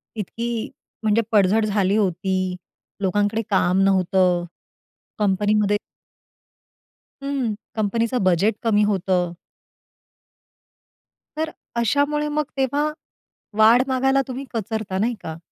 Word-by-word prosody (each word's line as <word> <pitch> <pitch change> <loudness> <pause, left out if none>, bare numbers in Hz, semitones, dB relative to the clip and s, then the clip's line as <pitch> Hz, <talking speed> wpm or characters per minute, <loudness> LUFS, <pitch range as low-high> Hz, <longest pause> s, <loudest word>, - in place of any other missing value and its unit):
इतकी 230 +2 -3 0.3
म्हणजे 220 +1 +3
पडझड 210 +1 +4
झाली 200 -1 +1
होती. 185 -1 0 0.5
लोकांकडे 205 +3 +1
काम 190 -1 +2
नव्हतं. 185 -2 +2 0.7
कंपनीमध्ये 205 +1 +2 1.4
हं, 275 -6 -1 0.2
कंपनीचं 230 +2 0
बजेट 185 +4 +3
कमी 210 -2 +3
होतं. 185 -3 0 2.0
तर, 315 0 -1 0.2
अशामुळे 285 +6 +1
मग 300 - +3
तेव्हा 285 +3 +1 0.7
वाढ 225 +3 +7
मागायला 270 +1 +2
तुम्ही 260 +2 -5
कचरता, 215 -3 -3
नाही 235 +4 +1
का? 160 -1 -6
210 Hz, 95 wpm, -22 LUFS, 190-235 Hz, 2.0 s, वाढ